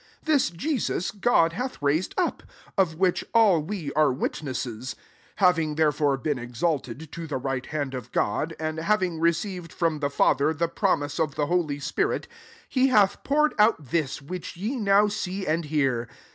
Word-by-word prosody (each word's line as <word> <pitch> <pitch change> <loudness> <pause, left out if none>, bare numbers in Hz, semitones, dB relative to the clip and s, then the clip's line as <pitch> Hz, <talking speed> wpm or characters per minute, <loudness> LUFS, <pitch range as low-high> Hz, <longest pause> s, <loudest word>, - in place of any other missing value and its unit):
32 315 - +2
This 280 -3 +3
Jesus, 195 - -2
God 195 -5 +3
hath 255 +8 -4
raised 150 +5 0
up; 365 - 0 0.3
of 185 -5 +2
which 180 +1 +1
all 205 -8 +5
we 160 -3 -5
are 155 -2 +4
witnesses. 130 -2 -4
S3 - - -30 0.4
Having 165 -5 +2
there 155 -1 +3
fore 145 -2 +1
been 140 0 -2
exalted 130 +3 -3
to 170 -1 -6
the 145 - -2
right 130 0 -3
hand 145 -3 -3
of 125 -2 -6
God, 150 +10 0
and 155 0 -3
having 180 -2 +1
receiv 170 +2 0
ed 165 - -14
from 165 -3 0
the 140 -1 0
Father, 145 +2 +2
the 170 +3 0
promise 145 -2 0
of 155 -4 0
the 150 - 0
holy 155 -3 0
spirit, 140 - -1 0.4
he 260 0 +2
hath 205 -6 +3
pour* 300 +2 +3
ed 305 - 0
out 210 - +3
this, 150 -4 -1
which 180 +3 -7
ye 215 +9 -2
now 205 -3 +4
see 195 -2 -3
and 160 +1 0
hear. 135 -6 0
160 Hz, 185 wpm, -26 LUFS, 145-190 Hz, 0.4 s, all